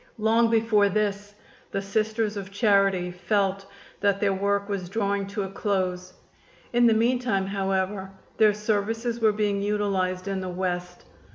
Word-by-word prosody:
Long 225 +1 +3
before 220 -3 +3
this 205 0 -2 0.3
the - - -2
Sisters 215 +1 -1
of 195 -2 -6
Charity 195 -3 +2
felt 195 +2 -1 0.3
that 200 -1 +2
their 200 -1 +2
work 200 +1 0
was 195 -4 -4
drawing 200 -1 -1
to 205 0 -3
a - - -3
close. 185 -3 -2 0.6
In 240 0 +5
the 225 - +4
meantime, 230 -3 +1
however, 195 0 -2 0.3
their 215 -2 +5
services 225 +3 -1
were 220 -2 +4
being 205 -1 0
utilized 195 -3 -1
in 195 -1 -2
the 185 - -4
West. 180 -1 -4
200 Hz, 150 wpm, -25 LUFS, 190-215 Hz, 0.6 s, In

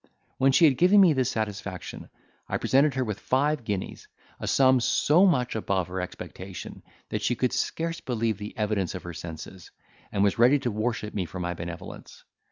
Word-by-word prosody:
When 135 +1 +5
she 140 +5 +5
had 135 -5 +3
given 185 +4 +6
me 180 -5 +7
this 130 -2 +1
satisfaction, 105 -5 -5 0.4
I - - -1
presented 135 +1 +3
her 130 - +1
with 105 -4 -4
five 140 +2 +1
guineas, 100 -4 -4 0.3
a - - -5
sum 130 -1 +4
so 160 +9 +4
much 125 -10 +1
above 95 -4 -1
her 95 +1 -3
expectation, 90 +1 -8 0.3
that - - -2
she 125 - +1
could 125 +1 0
scarce 165 +6 -2
believe 115 -4 -1
the 105 0 -8
evidence 105 -5 -1
of 90 - -7
her 85 - -7
senses, 85 +2 -9 0.4
and 100 - +1
was 100 +3 +1
ready 125 +5 +6
to 125 -4 -2
worship 110 0 -2
me 95 -3 -2
for 90 +4 -7
my 90 0 -2
benevolence. 85 +1 -9
110 Hz, 185 wpm, -26 LUFS, 95-130 Hz, 0.4 s, me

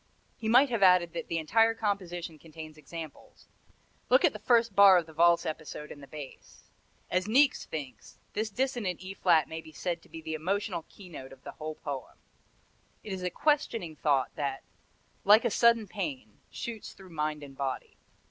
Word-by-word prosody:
He 220 - -3
might 255 +4 +6
have 230 -4 0
added 180 -3 +5
that 165 -1 -5
the 165 - -1
entire 225 +8 +3
composition 175 -7 -3
contains 155 -1 -10
examples 155 +1 -10 0.6
look - - +6
at - - +3
the - - -7
first 230 -4 +3
bar 200 -2 +9
of 170 - 0
the 160 - -14
valse 170 +1 +4
episode 155 -1 -6
in 145 - -10
the 140 - -11
bass. 145 -1 -11 0.5
As 185 +2 +1
Niecks 265 +5 +4
thinks, 135 -8 -8 0.2
"This 215 +1 -1
dissonant 240 -6 -1
E 190 +1 -6
flat 160 -5 +3
may 160 0 -6
be 160 - -14
said 170 +2 -3
to - - -21
be 165 - -8
the 160 0 -5
emotional 180 +2 -2
keynote 170 -9 -11
of 135 0 -15
the - - -7
whole 155 0 -6
poem. 140 -4 -6 0.9
It 210 - -5
is 190 - -5
a 180 - -1
questioning 230 - 0
thought 140 -3 +1
that, 140 -2 -3 0.6
like 215 +4 +6
a 235 - +2
sudden 230 -2 +4
pain, 145 - -5
shoots 235 -3 -6
through 190 -2 -15
mind 150 -1 -2
and 135 -1 -11
body." 135 -1 -4
170 Hz, 185 wpm, -29 LUFS, 155-210 Hz, 0.9 s, bar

